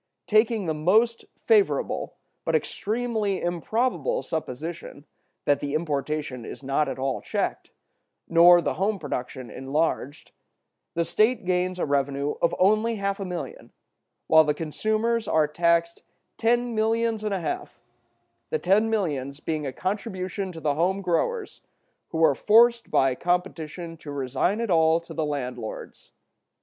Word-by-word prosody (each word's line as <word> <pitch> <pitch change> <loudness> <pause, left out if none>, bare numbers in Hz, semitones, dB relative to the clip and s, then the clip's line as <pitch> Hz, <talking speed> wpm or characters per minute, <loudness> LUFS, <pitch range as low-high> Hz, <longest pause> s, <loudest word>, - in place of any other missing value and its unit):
Taking 215 -1 +2
the 160 - 0
most 215 +10 +2 0.2
favorable 425 -3 +2 0.3
but - - 0
extremely 220 -3 -1
improbable 235 - -1
supposition, 160 0 -6 0.4
that 145 -1 +3
the 145 +1 -3
importation 150 -4 -2
is 140 - -9
not 140 +2 +1
at 130 - -4
all 135 0 -2
checked, - - -3 0.6
nor 170 +1 +7
the - - 0
home 200 +2 0
production 130 - -5
enlarged, 140 +1 -2 0.6
the 170 0 +1
state 215 +5 +2
gains 180 0 0
a - - -1
revenue 140 0 0
of 170 - +2
only 215 +4 +3
half 200 -1 -2
a 195 - -3
million, 185 - -7 0.5
while 160 0 +6
the 150 -1 0
consumers 215 +8 -1
are 155 -1 +3
taxed 170 +2 +1 0.4
ten 240 +1 +2
millions 225 0 0
and 210 -2 -1
a - - -2
half, 360 - -5 0.7
the 470 - 0
ten 215 - +2
millions 145 -10 -2
being 155 -2 -3
a - - -3
contribution 190 - -3
to 165 - -9
the 150 -2 0
home 185 +6 0
growers, 400 - -1 0.5
who 165 0 0
are 160 - +6
forced 235 - +4
by 135 -1 +3
competition 170 0 -3
to 155 - -11
resign 140 - -1
it 230 -4 -1
all 160 -1 +4
to 170 - -11
the 160 - -1
landlords. 125 -6 -6
175 Hz, 140 wpm, -25 LUFS, 150-215 Hz, 0.7 s, nor